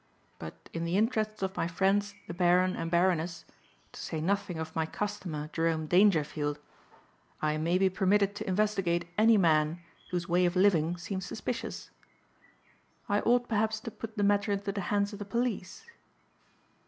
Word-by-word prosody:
But 80 0 -10
in 165 - -3
the 170 +3 0
interests 215 -2 0
of 190 +1 -2
my 165 - 0
friends 200 +3 +1
the - - -6
Baron 180 +1 +3
and 165 - -3
Baroness, 170 -1 +1 0.5
to - - -9
say 160 - -4
nothing 195 +1 -1
of 160 0 -6
my 160 -1 0
customer 175 -7 -4
Jerome 165 -1 0
Dangerfield, 155 -5 +2 0.8
I 155 0 0
may 165 +3 +1
be 190 +1 +3
permitted 195 +1 +2
to - - -5
investigate 185 -3 0
any 220 +1 +5
man 160 -2 +3 0.3
whose 175 -1 -2
way 180 +1 +3
of 175 - -2
living 175 -3 +3
seems 185 +2 -5
suspicious. 235 +2 -5 1.2
I 205 +1 +2
ought 245 +2 +2
perhaps 220 0 0
to 230 - -6
put 225 +1 -8
the 205 - +1
matter 205 +1 +2
into 200 0 -1
the 200 0 -3
hands 205 +2 0
of 205 - -8
the - - -4
police." 235 -2 -3
185 Hz, 165 wpm, -30 LUFS, 170-205 Hz, 1.2 s, any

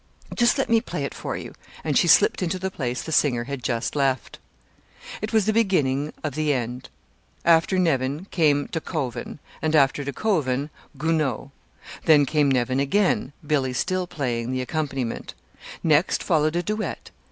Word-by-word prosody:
Just 240 +3 +3
let 270 - 0
me 230 -1 +3
play - - -4
it - - -4
for - - -4
you." - - -8 0.3
And - - -1
she - - +4
slipped 430 - +5
into 180 0 -1
the 190 +1 -3
place 125 -7 -3
the 160 - -6
singer 125 -6 +2
had 140 +1 -5
just 120 +1 -2
left. 135 -4 -1 0.8
It 215 - -3
was 220 -3 +3
the 215 - +2
beginning 150 -10 +1
of 155 -3 -2
the 155 0 +1
end. 125 0 -4 0.6
After 170 +3 +4
Nevin 145 -2 0
came 145 -4 +2
De 165 - -3
Koven, 130 -8 -4 0.2
and 155 0 +1
after 140 -1 +3
De 140 - -3
Koven, 145 -6 0 0.3
Gounod. 155 -2 -1 0.5
Then 150 -3 +6
came 145 0 +2
Nevin 130 0 +1
again, 145 0 +1
Billy 140 -4 0
still 185 +7 -1
playing 120 -7 -2
the 130 0 -1
accompaniment. 135 -3 -3 0.5
Next 160 +2 +2
followed 155 -2 +2
a 175 - 0
duet. 215 +3 -4
150 Hz, 165 wpm, -24 LUFS, 130-175 Hz, 0.8 s, Then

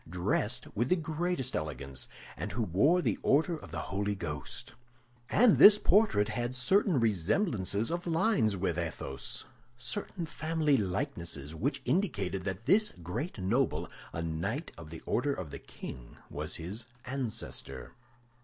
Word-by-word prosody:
dressed 95 +6 0
with 120 +4 +1
the 180 - +5
greatest 160 -4 -1
elegance, 70 -4 -4 0.3
and - - -4
who 120 - 0
wore 140 - +3
the - - 0
Order 160 +5 +3
of 155 - -10
the - - -5
Holy 100 +1 0
Ghost; 75 -7 -5 0.6
and 230 0 +5
this 210 0 +11
portrait 200 - +4
had 120 +3 -2
certain 170 +5 +3
resemblances 105 - +1
of 175 +1 -3
lines 160 - +2
with 90 -2 0
Athos, 80 -5 -3 0.3
certain 170 - -3
family 155 -1 +1
likenesses 85 - -2
which 135 - -2
indicated 115 - 0
that 95 +3 -4
this 215 +2 +5
great 120 - -4
noble, 110 +7 +1 0.2
a 80 - -3
knight 80 0 -2
of 80 -2 -10
the 80 0 -8
Order 140 +3 0
of 85 -6 -6
the - - -6
King, - - -9
was 75 +2 -1
his 100 +7 -6 0.2
ancestor. 125 - -4
115 Hz, 145 wpm, -31 LUFS, -, 0.6 s, this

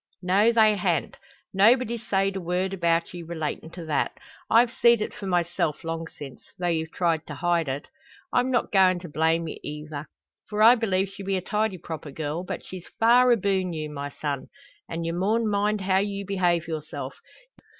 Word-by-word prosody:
"No, 200 +5 +4
they 220 -2 +5
han't. 175 -3 -1 0.3
Nobody's 230 +3 +4
sayed 195 -2 0
a 190 - -3
word 180 +2 -1
about 170 -2 +1
ye 175 - -6
relatin' 160 -1 -4
to 175 -2 -8
that. 155 -2 -1 0.3
I've 235 +1 +5
seed 235 -2 +4
it 215 - -3
for 195 - -7
myself, 175 -3 0
long 165 0 -4
since, 135 -5 -10 0.2
though 180 - -3
you've 160 -1 -1
tried 165 -3 +1
hide 170 +2 0
it. 135 +2 -4 0.5
I'm 250 - +2
not 245 -2 0
goin' 185 -2 +5
to 175 - -8
blame 160 +2 +1
ye - - -6
eyther, 150 0 -6 0.4
for 210 0 +1
I 230 +2 +9
believe 195 -5 0
she 200 0 -10
be 195 0 -1
a - - -2
tidy 210 0 -1
proper 160 -2 -7
girl. 150 +4 -4
But - - -6
she's 185 -2 -9
far 245 +2 +6
aboon 190 -5 +1
you, 155 -1 -4
my 145 -1 -5
son; 145 -1 -4 0.4
and 165 0 -4
ye 165 - -1
maun 210 +6 +1
mind 210 0 +1
how 190 0 +2
you 200 0 -2
behave 175 -4 +1
yourself. 155 -2 -6
180 Hz, 185 wpm, -26 LUFS, 165-205 Hz, 0.5 s, I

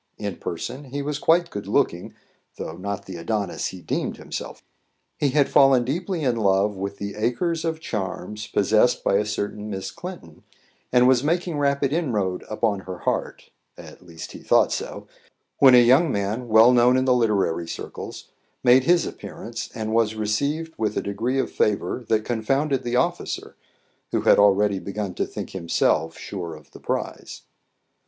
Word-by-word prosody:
In 100 -4 -4
person 130 - -5
he 140 +2 -4
was 145 0 -3
quite 170 +2 +3
good 100 -1 -6
looking, 100 -6 0 0.4
though 80 - -6
not 100 +2 -5
the 95 -2 -7
Adonis 100 +2 -2
he 95 - -8
deemed 80 - -3
himself. - - -7 0.6
He 145 - +2
had 140 +1 +3
fallen 135 -3 +5
deeply 170 +5 -2
in 125 -3 +1
love 100 -1 +2
with 100 +1 -5
the 100 0 -5
"acres 155 - -1
of 160 -1 -2
charms" 105 - -5
possessed 110 +4 +2
by 100 - +3
a 105 - 0
certain 105 0 -4
Miss 95 -2 -5
Clinton, 175 - -9 0.5
and 125 0 +5
was 130 -1 +4
making 170 0 0
rapid 140 -1 +1
inroad 105 - -1
upon 110 -2 0
her 95 -1 -7
heart - - -3 0.3
at - - -12
least 85 -2 -9
he - - -10
thought - - +3
so - - -4 0.5
when 130 -2 +8
a 120 - +8
young 135 +6 +5
man 105 +4 -2
well 110 +2 +7
known 125 +1 +5
in 130 - +1
the 130 - +4
literary 100 -8 +1
circles - - -7 0.3
made 125 +1 +6
his 175 +1 +4
appearance, 115 0 -7
and 110 -2 -3
was 110 -1 +2
received 140 +10 -1
with 110 -1 -1
a - - 0
degree 115 +6 -2
of 135 - -1
favour 105 +2 0
that 110 -1 +2
confounded 135 +4 0
the 120 0 -2
officer, 125 - -1 0.6
who - - +1
had - - +5
already 100 0 +4
begun 100 0 -4
to - - -2
think - - -7
himself 85 -3 0
sure 85 -5 -6
of 75 -3 -16
the - - -13
prize. - - -4
110 Hz, 170 wpm, -24 LUFS, 100-135 Hz, 0.6 s, when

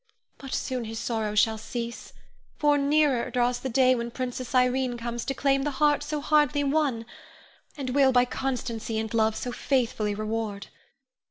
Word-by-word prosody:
But 270 -1 -9
soon 250 -3 -3
his 225 +1 -6
sorrow 220 -2 -2
all 210 - -5
shall 220 +1 +3
cease, 235 +1 -6 0.5
for 295 -1 +3
nearer 285 -3 +2
draws 245 -1 +1
the 265 - -4
day 255 +1 +4
when 235 -1 -2
Princess 255 +1 -5
Irene 250 0 +2
comes 235 0 -4
to 270 - -2
claim 275 0 +2
the 295 - 0
heart 295 -1 +3
so 295 0 -3
hardly 295 -1 +3
won, 275 -5 0 0.7
and 265 -3 -3
will 270 0 +4
by 250 -1 +4
constancy 240 -4 -3
and 220 0 -3
love 220 -1 +2
so 245 - -4
faithfully 225 -5 0
reward. 215 -1 -4
250 Hz, 170 wpm, -26 LUFS, 225-275 Hz, 0.7 s, day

